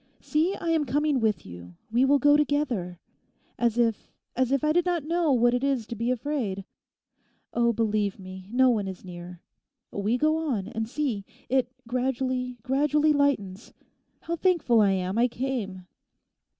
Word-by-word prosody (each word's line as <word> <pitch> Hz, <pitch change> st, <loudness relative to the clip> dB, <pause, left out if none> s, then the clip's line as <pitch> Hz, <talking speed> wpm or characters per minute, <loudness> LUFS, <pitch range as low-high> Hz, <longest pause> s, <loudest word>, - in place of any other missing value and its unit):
See, 330 Hz, +6 st, 0 dB
I 335 Hz, -, -4 dB
am 315 Hz, -2 st, +2 dB
coming 290 Hz, +2 st, +1 dB
with 220 Hz, -3 st, 0 dB
you; 90 Hz, 0 st, -11 dB, 0.2 s
we 245 Hz, +3 st, +3 dB
will 285 Hz, +1 st, +5 dB
go 290 Hz, +2 st, +5 dB
together. 260 Hz, -, 0 dB, 0.6 s
As 235 Hz, -1 st, +1 dB
if, 230 Hz, -3 st, 0 dB, 0.2 s
as 255 Hz, 0 st, +1 dB
if 275 Hz, +1 st, +1 dB
I 305 Hz, 0 st, +3 dB
did 350 Hz, +1 st, +3 dB
not 350 Hz, -3 st, -1 dB
know 330 Hz, 0 st, +1 dB
what 240 Hz, -1 st, +4 dB
it 245 Hz, +1 st, 0 dB
is 270 Hz, -5 st, 0 dB
to 235 Hz, -, -6 dB
be 230 Hz, +2 st, -2 dB
afraid. 245 Hz, -7 st, -2 dB, 0.9 s
Oh, 235 Hz, 0 st, +3 dB
believe 215 Hz, -3 st, 0 dB
me; 185 Hz, 0 st, -10 dB
no 255 Hz, +1 st, +4 dB
one 210 Hz, -4 st, -1 dB
is 190 Hz, 0 st, -8 dB
near; 175 Hz, -1 st, -9 dB, 0.5 s
we 210 Hz, +4 st, 0 dB
go 310 Hz, +4 st, +2 dB
on; 255 Hz, -12 st, -2 dB
and 225 Hz, 0 st, -4 dB
see! 250 Hz, -8 st, -2 dB, 0.3 s
it 255 Hz, -1 st, +1 dB, 0.2 s
gradually, 250 Hz, 0 st, -1 dB
gradually 295 Hz, +3 st, +2 dB
lightens. 230 Hz, -9 st, 0 dB, 0.5 s
How 335 Hz, -, -3 dB
thankful 330 Hz, -, +3 dB
I 200 Hz, -2 st, +4 dB
am 190 Hz, +3 st, -1 dB
I 245 Hz, -, +5 dB
came. 230 Hz, -8 st, -4 dB
245 Hz, 165 wpm, -26 LUFS, 205-290 Hz, 0.9 s, will